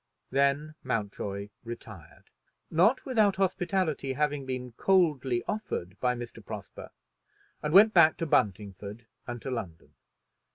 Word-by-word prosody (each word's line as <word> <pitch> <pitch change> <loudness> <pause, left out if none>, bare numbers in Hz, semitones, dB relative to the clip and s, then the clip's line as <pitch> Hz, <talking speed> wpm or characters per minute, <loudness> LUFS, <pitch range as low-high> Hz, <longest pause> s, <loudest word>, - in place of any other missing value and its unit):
Then 140 +3 +1
Mountjoy 100 -4 -3
retired, 105 -9 -10 0.4
not 195 +11 +3
without 215 -7 +3
hospitality 180 -7 0
having 145 -1 -1
been 125 -1 -4
coldly 140 -6 +2
offered 105 - -3
by 125 -1 +1
Mr. 120 -1 -8
Prosper, - - -8 0.7
and 150 - -2
went 210 +5 +7
back 160 -3 +6
to 165 - -2
Buntingford 105 - -1 0.2
and 120 -1 -4
to 135 - -4
London. 95 -10 -6
130 Hz, 120 wpm, -29 LUFS, 115-170 Hz, 0.7 s, went